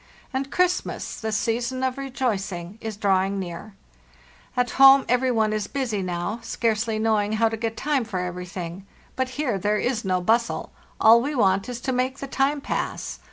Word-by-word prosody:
And 270 Hz, +1 st, -2 dB
Christmas, 360 Hz, 0 st, -1 dB
the 220 Hz, -1 st, -2 dB
season 235 Hz, +4 st, -1 dB
of 260 Hz, -1 st, 0 dB
rejoicing, 215 Hz, -9 st, -3 dB
is 220 Hz, -2 st, -5 dB
drawing 195 Hz, -1 st, +1 dB
near. 185 Hz, +2 st, -6 dB, 0.8 s
At 245 Hz, -1 st, +1 dB
home, 270 Hz, 0 st, +9 dB
every 250 Hz, +1 st, +2 dB
one 220 Hz, -3 st, +2 dB
is 210 Hz, -1 st, -2 dB
busy 245 Hz, -8 st, -2 dB
now, 180 Hz, +5 st, -3 dB
scarcely 225 Hz, -1 st, -1 dB
knowing 215 Hz, -1 st, +1 dB
how 225 Hz, +1 st, +3 dB
to 225 Hz, -, -3 dB
get 225 Hz, 0 st, -3 dB
time 285 Hz, -3 st, +1 dB
for 210 Hz, -5 st, -4 dB
everything; 180 Hz, +1 st, -6 dB, 0.3 s
but 260 Hz, 0 st, -1 dB
here 250 Hz, -10 st, 0 dB
there 210 Hz, +3 st, +1 dB
is 240 Hz, 0 st, -1 dB
no 185 Hz, -2 st, +1 dB
bustle; 230 Hz, +6 st, 0 dB, 0.3 s
all 230 Hz, +1 st, +7 dB
we 285 Hz, +4 st, -2 dB
want 195 Hz, -2 st, +2 dB
is 245 Hz, -1 st, -4 dB
to 260 Hz, -, -1 dB
make 255 Hz, +2 st, 0 dB
the 275 Hz, -, -5 dB
time 275 Hz, +2 st, 0 dB
pass. -, -, -3 dB
225 Hz, 175 wpm, -24 LUFS, 195-255 Hz, 0.8 s, home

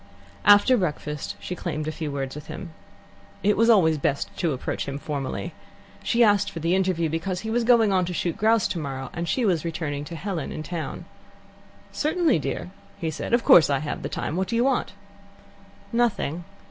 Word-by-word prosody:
After 205 Hz, +5 st, +7 dB
breakfast 150 Hz, -, -3 dB
she -, -, -5 dB
claimed 155 Hz, -2 st, -4 dB
a -, -, -1 dB
few 155 Hz, -2 st, -4 dB
words 135 Hz, -1 st, -3 dB
with 150 Hz, 0 st, -9 dB
him. 165 Hz, +2 st, -7 dB, 0.7 s
It 210 Hz, +1 st, +3 dB
was 230 Hz, +1 st, +3 dB
always 160 Hz, -9 st, +5 dB
best 140 Hz, 0 st, -1 dB
to 170 Hz, -4 st, 0 dB
approach 130 Hz, 0 st, -3 dB
him 140 Hz, 0 st, -3 dB
formally. 145 Hz, -2 st, -4 dB, 0.5 s
She 235 Hz, 0 st, +3 dB
asked 205 Hz, -2 st, +4 dB
for 165 Hz, -, -7 dB
the 165 Hz, +2 st, +1 dB
interview, 185 Hz, -3 st, +1 dB
because 175 Hz, +4 st, -3 dB
he 220 Hz, -, -4 dB
was 240 Hz, +1 st, +1 dB
going 225 Hz, -4 st, +4 dB
on 185 Hz, -1 st, +2 dB
to 180 Hz, -, -4 dB
shoot 170 Hz, -1 st, -1 dB
grouse 220 Hz, -1 st, +3 dB
tomorrow, 135 Hz, -6 st, -4 dB
and 170 Hz, -1 st, -3 dB
she 245 Hz, +7 st, +1 dB
was 175 Hz, -6 st, +1 dB
returning 155 Hz, -4 st, -3 dB
to 170 Hz, -, -7 dB
Helen 175 Hz, -3 st, -4 dB
in 155 Hz, -, -5 dB
town. 165 Hz, -1 st, -5 dB, 0.9 s
"Certainly, 315 Hz, -, +1 dB
dear," 140 Hz, +5 st, -4 dB, 0.4 s
said 155 Hz, -, -5 dB
he. -, -, +6 dB
"Of 235 Hz, -, 0 dB
course, 160 Hz, -, +7 dB
I 140 Hz, -, +2 dB
have 145 Hz, +1 st, -4 dB
the -, -, -4 dB
time. 150 Hz, -, -3 dB
What 190 Hz, +1 st, 0 dB
do 235 Hz, -, -2 dB
you 235 Hz, -, +3 dB
want?" 265 Hz, -5 st, 0 dB, 1.0 s
"Nothing." 200 Hz, -9 st, 0 dB
170 Hz, 195 wpm, -25 LUFS, 150-210 Hz, 1.0 s, After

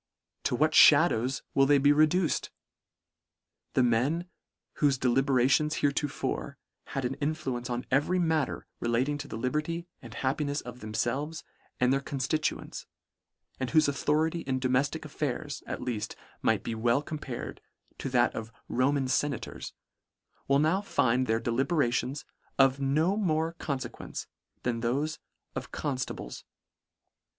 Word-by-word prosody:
To -, -, +1 dB
what -, -, +3 dB
fhadows 125 Hz, +4 st, +5 dB
will 135 Hz, 0 st, +4 dB
they 145 Hz, 0 st, +6 dB
be 145 Hz, +1 st, +5 dB
reduced? 155 Hz, +3 st, +3 dB, 1.3 s
The 130 Hz, -, +5 dB
men, 130 Hz, +9 st, +2 dB, 0.5 s
whofe 140 Hz, -3 st, +3 dB
delibera 130 Hz, 0 st, +3 dB
tions 150 Hz, +3 st, +3 dB
heretofore 140 Hz, -, -1 dB, 0.3 s
had 135 Hz, -2 st, -3 dB
an 125 Hz, -, 0 dB
influence 135 Hz, -5 st, -2 dB
on 120 Hz, 0 st, -2 dB
every 145 Hz, +7 st, +2 dB
matter 160 Hz, -4 st, 0 dB
relating 130 Hz, +5 st, 0 dB
to 145 Hz, -, -6 dB
the -, -, -6 dB
liberty 150 Hz, +7 st, -2 dB, 0.2 s
and 120 Hz, -, -10 dB
happinefs 140 Hz, +3 st, -1 dB
of 125 Hz, 0 st, -9 dB
themfelves 130 Hz, +8 st, -2 dB, 0.4 s
and 125 Hz, +1 st, +4 dB
their 135 Hz, -, +1 dB
conftituents, 140 Hz, +3 st, -2 dB, 0.7 s
and 130 Hz, -2 st, -1 dB
whofe 155 Hz, -2 st, +4 dB
authority 155 Hz, +4 st, +1 dB
in 130 Hz, -4 st, -2 dB
domeftic 130 Hz, +2 st, 0 dB
affairs, -, -, -3 dB
at -, -, -4 dB
leaft, 115 Hz, -4 st, -3 dB, 0.3 s
might -, -, +1 dB
well 120 Hz, +3 st, +1 dB
be -, -, -18 dB
compared 150 Hz, -6 st, -5 dB, 0.4 s
to 135 Hz, -, -3 dB
that 125 Hz, -2 st, +3 dB
of 110 Hz, +1 st, -6 dB, 0.2 s
Roman 135 Hz, +2 st, +1 dB
fenators, 140 Hz, 0 st, -2 dB, 0.7 s
will 140 Hz, -, +4 dB
now 160 Hz, +7 st, +2 dB
find 130 Hz, -, +1 dB
their 115 Hz, 0 st, +2 dB
deliberations 130 Hz, +2 st, 0 dB, 0.3 s
of 135 Hz, 0 st, +5 dB
no 155 Hz, +8 st, +2 dB
more 165 Hz, -5 st, 0 dB
confequence 140 Hz, -4 st, -4 dB, 0.4 s
than 120 Hz, -2 st, -1 dB
thofe 140 Hz, +6 st, -1 dB, 0.3 s
of -, -, -6 dB
confta 130 Hz, -4 st, -2 dB
bles. -, -, -8 dB
135 Hz, 135 wpm, -29 LUFS, 125-150 Hz, 1.3 s, they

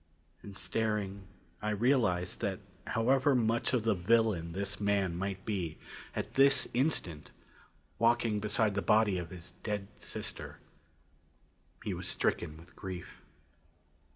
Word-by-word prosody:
And 100 Hz, -1 st, -9 dB
staring, 105 Hz, -3 st, -1 dB, 0.3 s
I 105 Hz, -, -1 dB
realized 105 Hz, -5 st, +2 dB
that -, -, -1 dB, 0.3 s
however 130 Hz, +5 st, +3 dB
much 115 Hz, -1 st, +2 dB
of 125 Hz, -4 st, +1 dB
the 115 Hz, -1 st, +3 dB
villain 100 Hz, -3 st, +2 dB
this 100 Hz, +2 st, -1 dB
man 100 Hz, -4 st, +1 dB
might 95 Hz, +1 st, -3 dB
be, 90 Hz, -7 st, -2 dB, 0.4 s
at -, -, -3 dB
this 135 Hz, 0 st, +6 dB
instant, 105 Hz, -, 0 dB, 0.7 s
walking 115 Hz, -2 st, +3 dB
beside 105 Hz, 0 st, +2 dB
the 100 Hz, -, 0 dB
body 105 Hz, 0 st, +3 dB
of 85 Hz, -2 st, -6 dB
his 85 Hz, -2 st, -9 dB
dead 105 Hz, -2 st, -3 dB
sister, -, -, -5 dB, 1.3 s
he -, -, -2 dB
was -, -, -5 dB
stricken 75 Hz, 0 st, 0 dB
with 85 Hz, +3 st, -16 dB
grief. 95 Hz, -2 st, -7 dB
105 Hz, 125 wpm, -32 LUFS, 95-115 Hz, 1.3 s, this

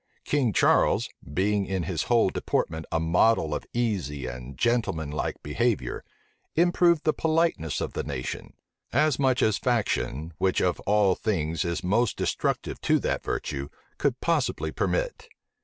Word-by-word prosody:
King 135 Hz, -6 st, +1 dB
Charles, -, -, +3 dB, 0.2 s
being 100 Hz, +5 st, +1 dB
in 95 Hz, -2 st, -1 dB
his 85 Hz, -3 st, -2 dB
whole 115 Hz, -5 st, +4 dB
deportment 80 Hz, 0 st, -2 dB
a 80 Hz, -, +1 dB
model 80 Hz, 0 st, +3 dB
of -, -, -4 dB
easy 90 Hz, -, -1 dB
and 65 Hz, +1 st, -7 dB
gentleman 110 Hz, -11 st, 0 dB
like 75 Hz, -, -3 dB
behavior, 115 Hz, +9 st, -1 dB, 0.5 s
improved 170 Hz, -1 st, +3 dB
the 155 Hz, -, +2 dB
politeness 160 Hz, -, 0 dB
of -, -, -3 dB
the -, -, -2 dB
nation; 65 Hz, -4 st, -5 dB, 0.4 s
as 150 Hz, -4 st, +2 dB
much 130 Hz, -2 st, +2 dB
as 110 Hz, -2 st, +2 dB
faction, 85 Hz, -, -1 dB
which 95 Hz, -1 st, +2 dB
of 90 Hz, -1 st, +1 dB
all 100 Hz, -2 st, +4 dB
things 85 Hz, -5 st, -1 dB
is 85 Hz, -1 st, -2 dB
most 110 Hz, +5 st, +1 dB
destructive -, -, -1 dB
to -, -, +3 dB
that -, -, -1 dB
virtue, 70 Hz, 0 st, -3 dB, 0.3 s
could 130 Hz, -4 st, 0 dB
possibly 165 Hz, -6 st, 0 dB
permit. -, -, -2 dB
100 Hz, 145 wpm, -26 LUFS, 80-125 Hz, 0.5 s, whole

